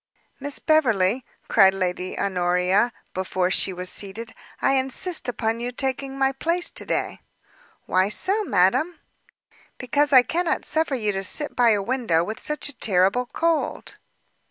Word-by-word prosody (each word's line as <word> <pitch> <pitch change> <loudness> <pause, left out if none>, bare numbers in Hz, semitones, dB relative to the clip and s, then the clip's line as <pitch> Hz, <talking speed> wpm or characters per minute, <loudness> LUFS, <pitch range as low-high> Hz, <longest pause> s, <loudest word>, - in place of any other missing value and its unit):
"Miss 285 0 -2
Beverley," 245 - +2 0.2
cried 190 0 +5
Lady 185 -1 -3
Honoria, 180 +4 +1 0.2
before 185 0 -1
she 190 - +1
was 180 0 -6
seated, 205 +5 -5 0.3
"I - - +2
insist 270 +4 0
upon 225 -1 -2
your 240 +1 -3
taking 270 +1 -2
my 270 0 +2
place 335 +6 -1
to - - -4
day." - - -2 0.6
"Why 185 +2 +2
so, 390 - +2
madam?" 310 - +1 0.8
"Because 285 +3 0
I 260 -2 +8
cannot 345 +5 -1
suffer 315 -3 0
you 215 -4 -1
to 195 -1 -3
sit 295 +9 0
by 245 -1 +4
a 205 -3 +2
window 230 -9 0
with 215 +5 -6
such 300 0 -3
a 290 - -5
terrible 200 +4 +1
cold." 330 +4 -2
240 Hz, 150 wpm, -23 LUFS, 190-285 Hz, 0.8 s, I